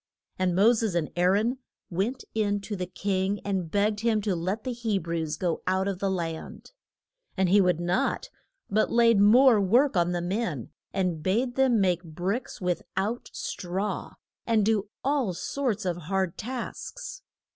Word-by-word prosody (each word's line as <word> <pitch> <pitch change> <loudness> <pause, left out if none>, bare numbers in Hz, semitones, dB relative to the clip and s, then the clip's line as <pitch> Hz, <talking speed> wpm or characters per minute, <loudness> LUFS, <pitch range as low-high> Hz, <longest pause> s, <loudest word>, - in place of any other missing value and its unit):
And 185 -2 +1
Mo 210 +6 +6
ses 220 -5 -1
and 165 -3 0
Aa 175 0 +2
ron 215 +7 +2 0.3
went 210 +9 -1
in 205 -2 +1
to 205 +1 -5
the 180 -2 -3
king 195 +2 -1
and 190 -4 -1
begged 205 +3 +1
him 225 -1 +2
to 200 -3 0
let 185 +6 -2
the 255 - -2
He 230 -4 -1
brews 165 -3 -3
go 175 -3 -1
out 190 +1 +1
of 195 -2 -2
the 195 - 0
land. 165 - -4 0.7
And 190 -1 +2
he 200 +2 +6
would 180 -3 +2
not, 180 - 0 0.4
but 215 +2 +1
laid 230 -2 +5
more 225 +2 +6
work 240 +7 +3
on 175 0 +2
the 175 -1 -1
men, 180 - -2 0.2
and 180 -5 -1
bade 230 +9 +1
them 255 -3 +3
make 180 -3 +2
bricks 180 +9 -3
with 180 -2 -1 0.2
out 215 +5 -1
straw, 190 +3 -4 0.3
and 220 -3 +3
do 210 -2 +1
all 265 -9 +1
sorts 230 -2 -2
of 175 -2 -1
hard 185 +1 -1
tasks. - - -6
200 Hz, 170 wpm, -27 LUFS, 180-230 Hz, 0.7 s, Mo